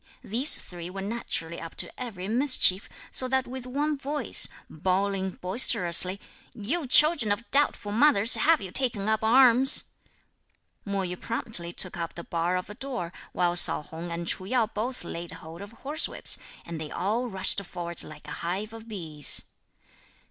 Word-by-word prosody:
These 250 +8 +6
three 175 -1 -8
were 195 +1 -7
naturally 195 -6 -5
up 165 0 -9
to - - -6
every 200 -7 -7
mischief, 230 -5 +2 0.2
so 255 - +5
that 265 0 0
with 255 0 -8
one 290 +3 -2
voice, 280 -2 +1 0.2
bawling 190 +3 -2
boisterously, 185 -2 +3 0.4
"You 270 +9 -3
children 300 -5 +5
of 220 +3 -3
doubtful 275 -7 +1
mothers, 230 -1 +3
have 325 0 +3
you 190 - -7
taken 230 -4 +1
up 220 0 0
arms?" 250 +2 +5 0.9
Mo 200 -1 -2
Yü 180 -1 -6
promptly 215 -7 -4
took 185 +1 0
up 170 -1 -6
the 170 - -8
bar 170 +2 -2
of 180 - -6
a 210 - -9
door; 240 -9 -5 0.2
while 175 -1 -1
Sao 175 - +5
Hung 165 +3 -9
and 170 0 -5
Ch'u 185 - -2
Yo 245 -3 +2
both 225 +4 -5
laid 170 0 -8
hold 165 +3 -11
of 200 +1 -10
horsewhips, 295 +3 0 0.3
and 165 -2 -7
they 155 - -6
all 225 +10 -2
rushed 195 -1 +2
forward 175 -2 -7
like 150 -1 -13
a - - -8
hive 195 +6 -4
of 225 0 -12
bees. 160 -9 +2
200 Hz, 165 wpm, -26 LUFS, 175-250 Hz, 0.9 s, These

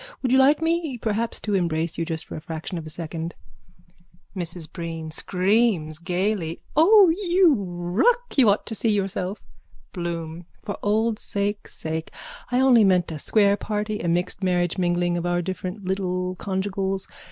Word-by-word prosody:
Would 255 - +1
you 260 - +5
like 290 +4 +4
me 325 -5 0
perhaps 225 0 -2
to 210 - -2
embrace 170 -3 0
you 165 - -2
just 160 -1 -4
for - - -8
a - - -6
fraction 165 +2 -5
of 155 - -8
a - - -7
second? 165 +1 -5 1.0
MRS 170 -3 -1
BREEN: 165 -2 -5
(Screams 185 -3 +1
gaily.) 180 -1 -1 0.2
O, 390 +4 +7
you 355 -1 +3
ruck! 200 - 0
You 255 -6 +6
ought 200 - +1
to - - -6
see 225 +1 0
yourself! 195 -1 -1 0.5
BLOOM: 170 -1 -5 0.2
For 205 - -4
old 215 +1 +1
sake' 205 +1 -2
sake. 160 0 -4 0.4
I 250 - +2
only 255 -4 +6
meant 180 -4 +3
a 155 - -5
square 200 +4 +3
party, 210 0 -3
a 175 - -3
mixed 175 +3 -1
marriage 180 0 +1
mingling 175 -1 +1
of 175 0 -2
our 175 0 0
different 185 +2 -5
little 185 -1 -1
conjugials. 195 0 -2
190 Hz, 165 wpm, -24 LUFS, 170-220 Hz, 1.0 s, O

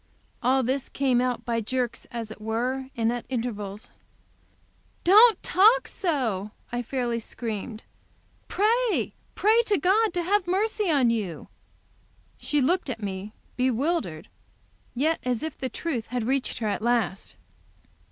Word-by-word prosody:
All 260 +1 +3
this 260 +2 -1
came 260 -3 +1
out 250 -1 -1
by 230 -1 0
jerks, 245 +1 -2
as 230 -2 -5
it 220 - -10
were, 250 +5 -2
and 230 0 +1
at 245 - -4
intervals. 220 -4 -4 1.1
"Don't 425 +3 +7
talk 440 +7 +5
so!" 250 - -1 0.2
I 240 0 -1
fairly 240 -1 -2
screamed. 220 -1 -5 0.6
"Pray, 455 +3 +1 0.2
pray 440 +3 +4
to 410 - +3
God 405 +7 +3
to 350 - 0
have 385 +1 +1
mercy 415 +2 0
on 270 -7 +4
you!" 200 -8 -3 0.9
She 295 -1 0
looked 345 +4 +1
at 225 -4 -5
me, 195 +1 -5 0.2
bewildered, 250 - 0 0.7
but - - -5
yet 320 +2 +2
as 250 +1 -1
if 315 -2 -4
the 260 - -4
truth 260 -9 -3
had 245 -1 -2
reached 265 +2 -1
her 225 - -2
at 205 - -1
last. 230 -5 0
250 Hz, 140 wpm, -26 LUFS, 225-340 Hz, 1.1 s, Don't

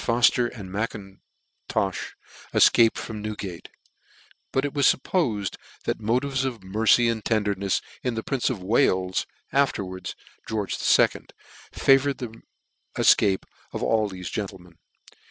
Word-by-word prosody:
Fofter 120 0 +3
and 100 -6 -9
M'Intofh 100 -1 -5 0.4
efcaped 115 -1 +5
from 110 -2 -6
Newgate; 105 -5 -6 0.8
but 135 +1 +1
it 145 - -3
/was 140 -3 +4
firppofed 115 - -1 0.3
that - - -1
motives 130 +5 0
of 120 -7 -4
mercy 110 +5 +3
and 115 -2 -1
tendernefs 100 -3 0 0.2
in 125 -2 -2
the 110 - -3
prince 135 -4 0
of 110 -8 -4
Wales, 95 -3 +1 0.3
afterwards 95 -10 -1 0.3
George 105 -3 -2
the - - -4
Second, - - +3 0.4
favoured 135 0 +3
the 120 -3 -6 0.6
efcape 95 -2 +4 0.3
of - - -3
all 110 -2 +2
thefe 90 -3 -7
gentlemen. 90 -5 -6
110 Hz, 125 wpm, -25 LUFS, 95-125 Hz, 0.8 s, efcaped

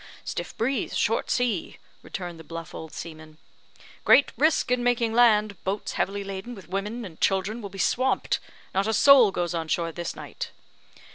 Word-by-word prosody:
"Stiff - - -5
breeze 250 +1 -1
short 225 - +1
sea," 240 -8 0 0.2
returned 175 -3 -6
the - - -10
bluff 165 +1 -8
old 160 -1 -8
seaman; 155 -1 -9 0.7
"great 280 - +6
risk 305 -4 +2
in 250 -1 +2
making 240 -2 +1
land 215 -4 +4
boats 195 +2 -2
heavily 200 +1 -1
laden 195 +5 -6
with 190 -6 -12
women 210 +5 -3
and 165 -5 -11
children 195 +4 +1
will 200 - -6
be 195 - -11
swamped. 255 +7 +1 0.3
Not 195 +2 +1
a 220 - +1
soul 260 -1 +7
goes 175 -2 -2
on 165 -1 -2
shore 165 +1 0
this 170 +1 -5
night." - - -7
200 Hz, 170 wpm, -26 LUFS, 175-235 Hz, 0.7 s, soul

